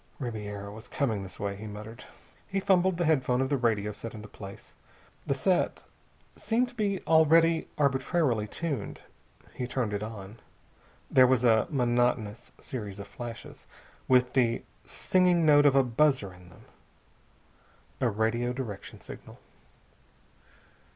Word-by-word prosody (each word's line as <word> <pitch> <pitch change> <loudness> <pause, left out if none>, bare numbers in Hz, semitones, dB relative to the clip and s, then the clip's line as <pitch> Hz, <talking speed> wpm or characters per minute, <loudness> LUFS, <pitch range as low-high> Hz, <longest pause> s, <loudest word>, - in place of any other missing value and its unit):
"Ribiera 105 -5 -5
was 110 +3 -11
coming 125 -6 -1
this 95 -1 -9
way," 100 -1 -2
he 105 +2 -8
muttered. 105 +3 -9 0.4
He 195 - -1
fumbled 185 -2 +2
the 175 - 0
headphone 130 -5 +2
of 130 0 0
the 145 - +2
radio 110 -5 0
set 115 +2 -8
into 105 0 -9
place. 100 -1 -11 0.5
The 140 - +1
set 175 +7 0 0.5
seemed 240 +2 0
to - - -15
be 205 -5 -1
already 165 +1 +4
arbitrarily 135 -4 +1
tuned. 140 -3 -4 0.5
He 125 - -4
turned 120 -4 -2
it 100 - -2
on. 105 0 -8 0.7
There 130 -1 +7
was 125 -1 +2
a 115 +1 +4
monotonous 120 -4 0
series 105 -6 -6
of 100 0 -8
flashes, 120 -2 -9 0.4
with 125 -1 +3
the 120 -3 +2 0.2
singing 180 -2 +2
note 145 -1 +6
of 140 - +4
a 135 - +6
buzzer 125 -5 +1
in 90 0 -16
them. - - -18 1.3
A 125 - +2
radio 115 +3 0
direction 115 -7 -7
signal. - - -11
125 Hz, 140 wpm, -28 LUFS, 105-145 Hz, 1.3 s, There